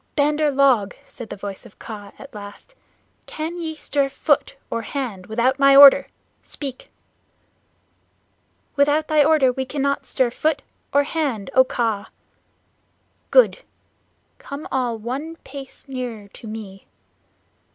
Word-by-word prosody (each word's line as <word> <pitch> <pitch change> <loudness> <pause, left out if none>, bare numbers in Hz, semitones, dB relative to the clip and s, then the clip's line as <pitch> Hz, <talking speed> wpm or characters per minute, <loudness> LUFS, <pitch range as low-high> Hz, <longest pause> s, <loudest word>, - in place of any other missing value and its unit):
"Bandar 300 +1 +2
log," 265 -7 +3
said 235 -4 -10
the - - -6
voice 200 -1 -7
of - - -16
Kaa 205 -3 -9
at 275 - -12
last, 205 - -11 0.5
"can 325 +3 -5
ye 320 -2 -4
stir 285 -2 -1
foot 390 - 0 0.2
or 230 - -1
hand 225 -7 -5
without 240 +5 +1
my 275 0 +6
order? 280 0 +9 0.3
Speak!" 270 -3 -7 1.9
"Without 290 +2 +2
thy 305 -1 +5
order 290 -4 +4
we 265 - -2
cannot 280 +1 -2
stir 255 -3 +1
foot 305 +3 -1 0.3
or 285 +1 +4
hand, 280 - -2
O 260 - +7
Kaa!" 225 -5 -2 1.2
"Good! - - +5 0.8
Come 280 +2 -8
all 245 -3 0
one 265 +9 -5
pace 275 0 -10
nearer 245 -6 -6
to 225 - -12
me." 210 -3 -9
270 Hz, 130 wpm, -22 LUFS, 225-290 Hz, 1.9 s, order